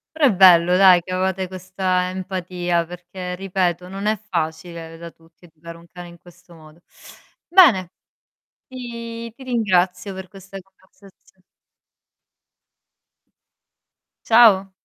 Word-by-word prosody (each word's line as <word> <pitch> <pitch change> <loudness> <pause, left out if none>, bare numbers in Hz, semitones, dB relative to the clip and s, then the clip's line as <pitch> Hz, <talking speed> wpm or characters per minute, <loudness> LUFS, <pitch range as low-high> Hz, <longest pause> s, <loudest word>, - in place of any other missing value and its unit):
Però 315 -2 +2
è 255 - +4
bello, 180 -2 +5
dai, 185 -2 +6
che 185 - -9
avevate 190 0 -2
questa 185 0 -3
empatia, 180 -2 -3
perché 180 +1 -8
ripeto, 180 -2 -2
non 195 +2 -6
è 215 +1 0
facile 165 -4 -6
da 170 0 -10
tutti 165 +2 -24
educare 165 0 -13
un 170 - -18
cane 175 -1 -11
in 170 0 -15
questo 175 0 -19
modo. 155 +1 -18 0.7
Bene, 255 - +4 0.8
ti 235 -2 -8
ti 265 - -15
ringrazio 195 -6 -1
per 190 0 -9
questa 195 0 -14
conversazio 190 0 -24 2.9
Ciao. 215 -5 +5
185 Hz, 115 wpm, -20 LUFS, 175-195 Hz, 2.9 s, dai